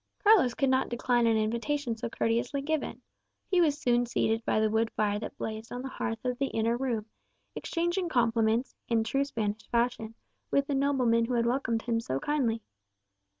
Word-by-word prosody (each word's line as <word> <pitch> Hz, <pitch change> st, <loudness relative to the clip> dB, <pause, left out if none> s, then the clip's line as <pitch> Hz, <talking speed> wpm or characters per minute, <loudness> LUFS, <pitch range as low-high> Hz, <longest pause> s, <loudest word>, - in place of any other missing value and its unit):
Carlos 405 Hz, -, +5 dB
could 275 Hz, -1 st, +2 dB
not 260 Hz, 0 st, +2 dB
decline 240 Hz, 0 st, +1 dB
an 225 Hz, -1 st, +3 dB
invitation 235 Hz, +4 st, -1 dB
so 230 Hz, +1 st, -4 dB
courteously 235 Hz, +5 st, 0 dB
given. 315 Hz, +1 st, -2 dB, 0.5 s
He 365 Hz, -2 st, +4 dB
was 295 Hz, -4 st, +3 dB
soon 245 Hz, -4 st, +2 dB
seated 225 Hz, -1 st, 0 dB
by -, -, +2 dB
the 220 Hz, -, +3 dB
wood 225 Hz, +1 st, +2 dB
fire 205 Hz, -1 st, +1 dB
that 220 Hz, -, -7 dB
blazed 220 Hz, +1 st, -5 dB
on 245 Hz, +1 st, -5 dB
the 265 Hz, -, -4 dB
hearth 225 Hz, -2 st, -4 dB
of 250 Hz, -1 st, -1 dB
the 275 Hz, -, +1 dB
inner 225 Hz, 0 st, 0 dB
room, 240 Hz, -4 st, -2 dB, 0.5 s
exchanging 345 Hz, +1 st, -1 dB
compliments, 230 Hz, -2 st, +1 dB
in 230 Hz, -1 st, +2 dB
true 275 Hz, +5 st, 0 dB
Spanish 220 Hz, -5 st, -3 dB
fashion, 235 Hz, -2 st, 0 dB, 0.3 s
with 280 Hz, -, +2 dB
the 285 Hz, -, -2 dB
nobleman 260 Hz, -4 st, +2 dB
who 245 Hz, +1 st, -1 dB
had 235 Hz, 0 st, +2 dB
welcomed 235 Hz, -2 st, 0 dB
him 230 Hz, -1 st, 0 dB
so 135 Hz, -, -2 dB
kindly. 235 Hz, -, 0 dB
235 Hz, 185 wpm, -29 LUFS, 225-270 Hz, 0.5 s, Carlos